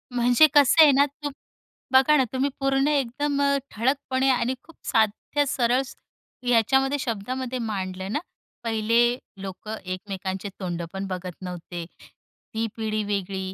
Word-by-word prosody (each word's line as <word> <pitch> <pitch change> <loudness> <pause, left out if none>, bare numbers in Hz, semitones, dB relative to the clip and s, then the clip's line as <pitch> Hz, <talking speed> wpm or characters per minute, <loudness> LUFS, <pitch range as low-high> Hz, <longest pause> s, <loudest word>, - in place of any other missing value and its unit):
म्हणजे 245 +5 +6
कसं 290 +3 +7
आहे 300 - +7
ना? 280 +1 +5
तू 290 +1 -6 0.6
बघा 265 +3 +6
ना 265 - +4
तुम्ही. 265 +2 +1
पूर्ण 270 0 +2
एकदम 285 0 0
अ, 280 0 +3
ठळकपणे 260 +3 0
आणि 250 0 +1
खूप 330 - -17
साध्या, 225 +6 +1
सरळ 250 0 +2 0.6
ह्याच्यामध्ये 265 +4 +3
शब्दामध्ये 255 +3 -3
मांडलं 190 -4 -4
ना. 295 - 0 0.4
पहिले 230 +2 +2 0.2
लोक 195 +2 -8 0.2
एकमेकांचे 190 +1 -4
तोंड 175 -3 -3
पण 195 0 -4
बघत 185 -2 -5
नव्हते, 175 -1 -6 0.7
ती 225 +1 -1
पिढी 215 -1 -2
वेगळी. 195 -2 -3
235 Hz, 135 wpm, -25 LUFS, 195-270 Hz, 0.7 s, कसं